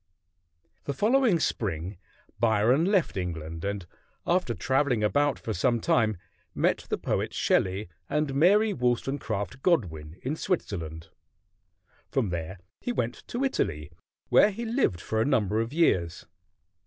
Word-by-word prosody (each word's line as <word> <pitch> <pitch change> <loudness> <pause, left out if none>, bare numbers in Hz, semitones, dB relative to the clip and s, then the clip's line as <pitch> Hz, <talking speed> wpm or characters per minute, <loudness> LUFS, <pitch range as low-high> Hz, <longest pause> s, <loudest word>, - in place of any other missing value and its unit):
The 140 - -3
following 225 - +3
spring 90 - -2 0.4
Byron 115 +6 +3
left 195 -3 +2
England, 80 -3 -4
and 100 -2 -3 0.4
after 175 -9 +1
traveling 130 -4 +1
about 145 +6 +2
for 110 - -4
sometime 110 +2 +2 0.4
met - - +1
the - - 0
poet - - -2
Shelley 95 +2 +1 0.2
and 150 -2 0
Mary 200 +9 +4
Wollstonecraft 125 -2 -2
Godwin 85 - 0
in 135 +4 -1
Switzerland. 85 - -3 1.0
From 125 -7 0
there 85 +2 -4 0.2
he 245 - -3
went 120 - -1
to 245 +3 -2
Italy, 75 - -1 0.4
where 205 - +6
he 225 +4 -5
lived 225 - +1
for 110 0 -1
a - - +4
number 110 -6 +2
of 115 +2 -3
years. 90 - +1
120 Hz, 130 wpm, -27 LUFS, 95-155 Hz, 1.0 s, where